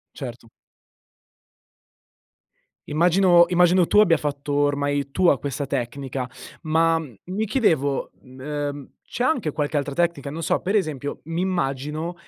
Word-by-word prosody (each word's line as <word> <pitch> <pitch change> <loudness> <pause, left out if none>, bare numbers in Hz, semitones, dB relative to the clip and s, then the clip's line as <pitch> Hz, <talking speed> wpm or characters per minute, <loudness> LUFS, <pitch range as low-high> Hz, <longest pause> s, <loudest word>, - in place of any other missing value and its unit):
Certo. 120 -4 -8 2.4
Immagino 175 +2 +5
immagino 180 0 +4
tu 210 - +3
abbia 170 -6 +5
fatto 145 0 -3
ormai 145 -1 0
tua 170 -3 +3
questa 140 0 -4
tecnica, 130 0 -3 0.4
ma, 165 +1 +2
mhmm, 145 -7 -9
mi 195 +5 -2
chiedevo, 160 - +1
m 130 0 -15
ehm, 145 0 -4 0.2
c'è 245 - -2
anche 240 - 0
qualche 150 0 -2
altra 140 0 -3
tecnica, 165 -4 -1
non 165 +3 -6
so, - - +1
pre 195 +4 0
esempio, 145 -6 -4
m'immagino 165 -2 -2
150 Hz, 125 wpm, -23 LUFS, 140-175 Hz, 2.4 s, Immagino